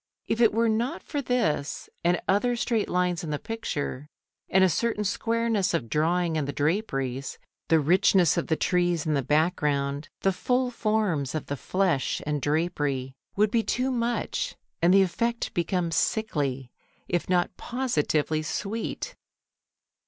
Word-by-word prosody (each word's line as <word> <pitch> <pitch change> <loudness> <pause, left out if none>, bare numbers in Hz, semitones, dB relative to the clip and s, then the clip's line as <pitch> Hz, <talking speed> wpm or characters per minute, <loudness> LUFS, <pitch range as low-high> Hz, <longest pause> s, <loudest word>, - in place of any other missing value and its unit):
If 225 - -1
it 230 - +6
were 230 +2 +2
not 220 -2 -1
for 290 - -3
this 235 - -1 0.2
and 175 0 +3
other 225 +5 +2
straight 230 -2 0
lines 180 -1 0
in 160 - -4
the 150 - -1
picture, 145 - -4 0.4
and 190 0 +4
a - - +7
certain 215 +3 0
squareness 225 -2 0
of 115 -9 -2
drawing 165 +1 +1
in 150 - 0
the 140 - -2
draperies, 140 - -1 0.3
the 160 - +5
richness 180 +2 +4
of - - -1
the 160 - +2
trees 175 -1 +1
in 155 - +1
the 140 - +2
background, 145 -1 0
the 195 - +2
full 250 +5 0
forms 210 - 0
of 155 - -3
the 140 - -3
flesh 180 -2 0
and 150 -1 -1
drapery 145 -4 -1 0.2
would 210 0 +3
be 230 - +3
too 255 +4 -1
much, 240 - -1 0.3
and 170 +2 +5
the 195 +1 +7
effect 230 +6 -1
become 175 0 0
sickly, 140 - -1 0.4
if 175 0 -1
not 180 0 +1
positively 160 - 0
sweet. 220 - -4
180 Hz, 150 wpm, -27 LUFS, 150-220 Hz, 0.4 s, a